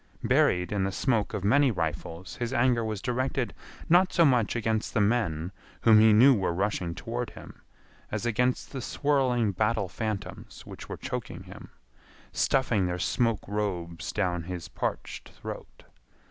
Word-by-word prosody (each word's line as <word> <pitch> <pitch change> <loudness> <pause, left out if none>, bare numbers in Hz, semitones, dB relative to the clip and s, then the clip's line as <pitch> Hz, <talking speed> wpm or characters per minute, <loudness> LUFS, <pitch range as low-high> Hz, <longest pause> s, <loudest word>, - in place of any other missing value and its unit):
Buried 90 +2 +2
in 100 -2 0
the 95 - 0
smoke 110 0 0
of 100 - -4
many 135 +7 +4
rifles 85 -1 -4
his 120 -1 -3
anger 120 -1 +2
was 110 -3 -4
directed 130 0 -1 0.3
not 180 +3 +5
so 170 - +4
much 125 -6 +2
against 110 -1 -1
the - - +3
men 100 -6 0 0.3
whom 110 -2 +7
he 110 0 +6
knew 125 +6 +7
were 95 -6 0
rushing 90 -3 -1
toward 120 +6 -4
him - - -13 0.5
as - - -3
against 125 +2 0
the 135 - -5
swirling 130 -6 +1
battle 105 +1 0
phantoms 110 0 -6
which - - -10
were - - -5
choking - - -5
him, - - -12 0.6
stuffing 115 -8 +1
their 90 0 -2
smoke 115 +4 0
robes 90 -5 -3
down 90 -5 -1
his 90 -2 -6
parched - - -4
throat. - - -9
110 Hz, 155 wpm, -28 LUFS, 95-120 Hz, 0.6 s, whom